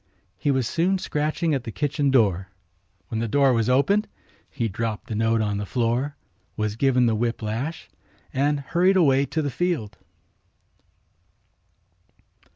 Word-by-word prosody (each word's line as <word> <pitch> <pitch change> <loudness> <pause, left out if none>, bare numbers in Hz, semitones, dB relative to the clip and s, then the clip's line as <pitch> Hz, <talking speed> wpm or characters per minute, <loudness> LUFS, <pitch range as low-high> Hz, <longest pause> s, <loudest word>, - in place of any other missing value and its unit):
He - - 0
was 130 -4 +1
soon 175 +8 +1
scratching 155 0 -1
at 135 -4 -1
the 115 - -6
kitchen 145 +2 0
door. 100 -8 +2 0.6
When 110 - -2
the 115 - -1
door 135 +3 +3
was 115 0 +1
opened 195 +12 +3 0.4
he 120 -5 -2
dropped 110 +2 -3
the 120 - -6
note 115 +1 +2
on 105 -1 -1
the - - -2
floor, 125 +6 0 0.4
was 105 -1 -1
given 125 0 +3
the 115 - +2
whip 115 +1 -1
lash 120 +10 -4 0.5
and 145 +2 +1
hurried 180 +6 +2
away 140 -5 +4
to 155 +4 -2
the 145 - -2
field. 165 - -2
130 Hz, 150 wpm, -24 LUFS, 115-150 Hz, 0.6 s, away